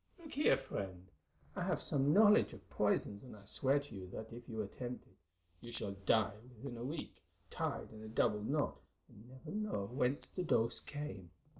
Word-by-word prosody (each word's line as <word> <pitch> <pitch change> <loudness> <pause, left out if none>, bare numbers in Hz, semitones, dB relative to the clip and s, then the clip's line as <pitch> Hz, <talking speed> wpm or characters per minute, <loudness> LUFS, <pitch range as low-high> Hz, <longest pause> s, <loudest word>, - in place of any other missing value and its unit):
"Look 320 -4 -10
here, 295 - +5
friend, 95 -2 -5 0.5
I - - -2
have - - +1
some 140 +1 +3
knowledge 210 - +7
of 100 -4 -13
poisons, 105 0 +1
and 125 -4 -10
I 100 -1 -14
swear 135 +6 +3
to 140 -4 -10
you 95 -1 -6
that 110 +5 -7
if 120 +2 -9
you 110 -1 -2
attempt 125 +5 -5
it, 95 - -24 0.4
you 120 - -9
shall 110 -3 -1
die 100 +1 +2 0.2
within 125 +2 -6
a 115 - -5
week, 150 +5 -5 0.3
tied - - -2
in 110 -1 -10
a 110 - -7
double 110 -1 +2
knot, 145 +7 0 0.3
and 110 +4 -15
never 130 +4 -9
know 210 - -1
whence 130 +1 +1
the 185 - -4
dose 115 -8 +3
came. 145 - -6
120 Hz, 190 wpm, -37 LUFS, 105-145 Hz, 0.5 s, knowledge